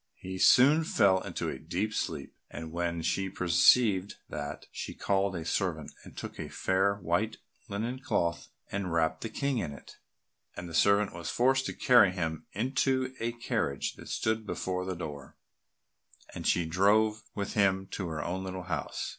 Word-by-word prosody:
He 95 0 -7
soon 145 - +6
fell 95 -10 +3
into - - -4
a - - -4
deep 110 +1 -2
sleep, 75 -9 -3 0.2
and 80 -1 -7
when 85 -1 -2
she 95 +3 0
perceived 95 +3 +4
that, 75 -1 -5
she - - -6
called 100 -1 0
a 80 -2 -4
servant 85 -3 -1
and - - -14
took - - -7
a - - -5
fair 95 +1 +1
white 100 +4 -1 0.3
linen 115 +6 -3
cloth 85 -9 -1 0.2
and 100 -3 -2
wrapped 80 -1 +1
the 115 - -4
King 140 -1 -1
in 80 -8 -3
it, 70 - -13 0.6
and 90 - -5
the 85 - -9
servant 100 +4 +3
was 85 -1 -5
forced 130 +2 +2
to - - -3
carry 120 -8 +5
him 80 -3 -3
into 130 +3 0
a 115 +1 -1
carriage 115 - -2
that - - -12
stood 110 0 0
before 90 -1 -2
the 95 -1 -3
door, 75 -5 -8 1.0
and - - -4
she 85 - +2
drove 105 +6 +3
with 100 -1 -3
him 95 -2 +2
to 95 - -3
her 80 -2 -3
own 95 +2 -3
little 95 -1 -5
house. 80 -6 -3
95 Hz, 170 wpm, -30 LUFS, 85-110 Hz, 1.0 s, soon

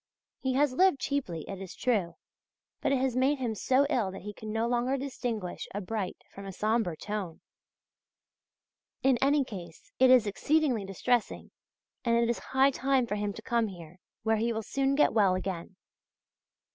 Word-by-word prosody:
He 260 -1 -1
has 280 0 +2
lived 370 -1 +4
cheaply, 250 - -2
it 195 -1 -6
is 190 - -8
true, 205 -9 0 0.7
but - - +1
it 275 - +3
has 255 -1 0
made 265 +3 +3
him 245 -4 -2
so 260 +6 +2
ill 240 -9 +1
that 190 -1 -9
he 210 +1 -6
can 215 +1 -7
no 225 +1 0
longer 245 +3 +1
distinguish 240 -8 -4
a - - -1
bright 205 -1 -3 0.2
from 195 0 -9
a - - -5
sombre 210 -3 0
tone. 205 -5 -5 1.6
In 260 -2 +4
any 280 +1 +4
case 175 -9 -10
it 260 0 +6
is 255 -3 +7
exceedingly 250 +1 +1
distressing, 225 +5 -1 0.5
and 235 -1 +2
it 235 0 +3
is 235 - -3
high 265 +1 +3
time 265 -1 +1
for 230 - -4
him 205 0 -1
to 220 - -10
come 235 -2 +1
here, 175 -2 -11 0.2
where 220 0 +2
he 230 +2 0
will 220 -1 -3
soon 275 +4 0
get 295 - +4
well 200 -4 +4
again. 185 -1 -4
230 Hz, 180 wpm, -29 LUFS, 195-265 Hz, 1.6 s, is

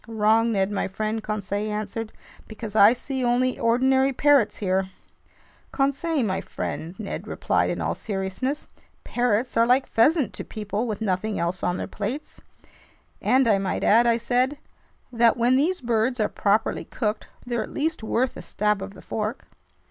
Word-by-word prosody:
"Wrong, 225 +1 +2
Ned 195 -1 +1
my 205 - -1
friend," 215 +3 -3
Conseil 210 0 -3
answered, 215 +1 -4 0.4
"because 220 -1 -8
I 210 0 +8
see 260 +1 -3
only 250 +1 +1
ordinary 265 +3 +3
parrots 275 -4 +3
here." 190 -1 0 0.8
"Conseil 280 +2 0
my 190 -3 -1
friend," 165 +3 -5
Ned 215 -3 -6
replied - - 0
in - - -2
all - - 0
seriousness, 205 +8 -3 0.4
"parrots 245 0 0
are 230 0 +5
like 255 +2 +4
pheasant 280 - +2
to - - -5
people 210 +2 -4
with 215 -2 -4
nothing 205 +1 -1
else 175 +2 -2
on 180 0 0
their - - -3
plates." 245 +9 -5 0.8
"And 260 0 +3
I 205 -3 +4
might 195 - -2
add," 235 +3 +5
I 230 -1 +4
said, 250 +4 0 0.5
"that 235 -1 +3
when 240 +2 +3
these 325 +7 +1
birds 235 +1 0
are 210 - +2
properly 215 +2 0
cooked, 215 -3 -3 0.2
they're 240 -2 -1
at - - -5
least 315 0 -2
worth 240 +3 0
a - - -7
stab 210 -1 -1
of 195 +1 -7
the - - -13
fork." 215 +3 -4
225 Hz, 165 wpm, -24 LUFS, 210-255 Hz, 0.8 s, I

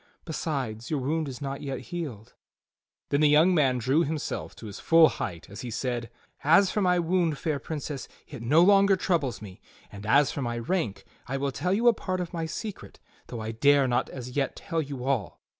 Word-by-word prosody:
Besides, 135 -9 -3
your 150 - 0
wound 155 +4 -1
is 135 +1 -7
not 135 0 -4
yet 135 -2 -4
healed." 140 - -6 0.8
Then 140 - +1
the 150 - +5
young 160 +5 +5
man 135 -6 +3
drew 130 +7 +2
himself 155 -4 -3
to - - -11
his 105 -2 -8
full 165 -1 +6
height 85 -4 -5
as 100 - -9
he 125 - -5
said: 120 0 -3 0.3
"As 185 +6 +5
for 210 - 0
my 180 -2 +3
wound, 170 -3 +1
fair 150 -1 -2
Princess, 145 -2 -5 0.2
it - - -9
no 150 +9 +5
longer 200 0 +6
troubles 145 - -1
me; 95 -3 -11 0.3
and 100 0 -9
as 140 +5 +4
for 145 - -4
my 120 -2 -2
rank, 120 - -2 0.2
I 135 - -2
will 140 0 -1
tell 145 +8 -2
you 235 +3 +2
a 240 - +7
part 185 -3 -3
of 180 0 -4
my 165 -1 -2
secret 210 +5 -7 0.3
though 115 - -6
I 110 +1 -4
dare 140 +4 +4
not 125 +1 0
as 125 -1 -7
yet 135 0 -1
tell 165 -2 -2
you 140 -4 -6
all. 130 -9 -1
140 Hz, 210 wpm, -27 LUFS, 125-165 Hz, 0.8 s, a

